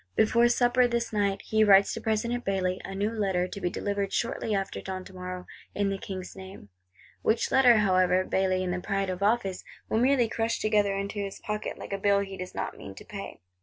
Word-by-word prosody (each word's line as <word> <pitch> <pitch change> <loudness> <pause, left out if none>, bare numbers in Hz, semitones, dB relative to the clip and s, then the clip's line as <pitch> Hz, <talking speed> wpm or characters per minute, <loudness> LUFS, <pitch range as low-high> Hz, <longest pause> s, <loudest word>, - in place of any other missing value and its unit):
Before 235 +2 +4
supper, 245 0 +3
this 235 -1 -2
night, 200 -2 0
he 220 0 +2
writes 200 -1 +6
to - - -5
President 235 +2 -1
Bailly, 185 -1 -1
a 195 - -6
new 205 +3 0
Letter, 190 -5 0
to 200 - -8
be 175 - 0
delivered 200 +1 -2
shortly 225 -2 -1
after 195 -1 -3
dawn 185 -1 -6
tomorrow, 185 -1 -7 0.3
in 200 -1 +1
the 195 - -3
King's 185 -2 -7
name. 190 - -11 0.5
Which 225 +1 +1
Letter, 250 -3 +6
however, 185 -2 +3
Bailly 185 0 0
in 180 - -2
the 180 - -2
pride 195 -1 -1
of 180 +1 -6
office, 200 -3 +1 0.3
will 220 - +1
merely 255 -1 +3
crush 225 +1 -1
together 210 -2 +2
into 200 +1 -4
his 200 -1 -4
pocket, 210 0 -4
like - - -7
a 195 - -2
bill 200 0 +3
he 195 -1 -6
does 185 -1 -7
not - - -3
mean 95 - -9
to - - -12
pay. - - -8
200 Hz, 210 wpm, -28 LUFS, 190-220 Hz, 0.5 s, writes